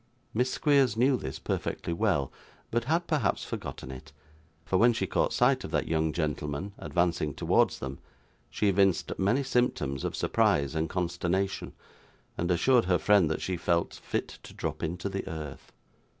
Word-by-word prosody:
Miss 125 +3 +1
Squeers 140 -7 +3
knew 130 +3 +4
this 65 - -5
perfectly 85 - -3
well, 85 - +1 0.4
but 120 0 0
had 165 +5 +1
perhaps 145 -13 0
forgotten 65 - -6
it, 65 -1 -10 0.5
for 95 - +1
when 120 +4 +5
she 110 -4 -1
caught 90 - +1
sight - - +3
of - - -5
that - - 0
young 80 -1 +1
gentleman 75 +3 -3
advancing 85 -5 0
towards - - +2
them, 65 +1 -6 0.5
she 105 - 0
evinced 95 -1 +2
many 115 +9 +2
symptoms 75 - 0
of - - -2
surprise 70 -1 +2
and 80 0 -1
consternation, 90 +2 -1 0.6
and 85 - -2
assured 120 +6 +4
her 90 -1 +3
friend 100 -6 +4
that 80 - -2
she 90 -1 -2
'felt 85 0 0
fit - - -4
to - - -13
drop - - -4
into 85 +4 -3
the 95 0 -4
earth. 75 -3 -7
90 Hz, 165 wpm, -29 LUFS, 80-110 Hz, 0.6 s, when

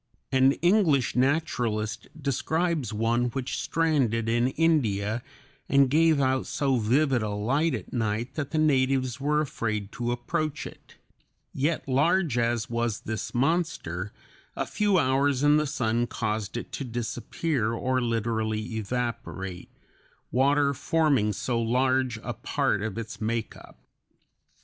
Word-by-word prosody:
An 130 +1 +5
English 175 - +3
naturalist 120 -6 0
describes 155 - -1
one 115 +3 +1
which 125 +1 -3
stranded 135 -9 +1
in 120 +2 +2
India 120 -9 +1 0.5
and 140 -2 +4
gave 160 0 +4
out 130 -1 +1
so 135 -3 +1
vivid 125 +3 +2
a 110 - -2
light 130 +11 0
at - - -8
night 115 +2 -1
that 145 -3 -3
the 160 - -2
natives 135 -3 +2
were 150 +2 +2
afraid 105 -8 -3
to 120 -1 -2
approach 150 +5 -2
it; - - -12 0.6
yet 150 +3 -1
large 150 +2 +2
as 120 -1 0
was 115 -2 -2
this 110 +2 -5
monster, 120 - -1 0.4
a - - -1
few 205 -2 +1
hours 135 -1 +2
in 145 +1 +5
the 150 0 +1
sun 120 -4 0
caused 110 -1 -3
it - - -6
to - - -4
disappear 120 +1 -2
or 130 +2 0
literally 110 -1 -1
evaporate, 105 -5 -4 0.6
water 140 +3 +3
forming 140 -7 +2
so 115 +3 -1
large 130 +1 +1
a - - -3
part 100 - -1
of 110 0 -4
its 110 -2 -6
make 115 +1 -2
up. - - -15
125 Hz, 135 wpm, -27 LUFS, 115-145 Hz, 0.6 s, An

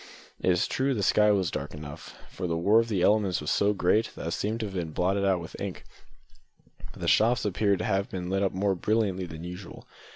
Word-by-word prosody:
It - - 0
is 90 -1 +3
true 135 0 0
the 105 - -1
sky 105 +2 +4
was 95 -5 +1
dark - - -5
enough, 75 -1 -9
for 90 - -5
the 85 -1 -1
war 100 +7 +4
of 115 0 -1
elements 100 0 +2
was 75 - -3
so 100 +1 +3
great 105 +2 +2
that - - -7
it - - -4
seemed 110 +6 -2
to - - -1
have 100 - -7
been 85 -4 -4
blotted 95 +4 +1
out 95 -2 +2
with 85 - -9
ink, - - -5 1.1
but - - -14
the - - -2
shops 115 +1 +3
appeared 100 0 +1
to - - -3
have 100 -1 0
been 90 -1 -5
lit 95 +1 0
up 95 - +1
more 100 +1 0
brilliantly 95 -1 0
than 80 0 -9
usual. 90 +2 -9
95 Hz, 230 wpm, -27 LUFS, 90-105 Hz, 1.1 s, sky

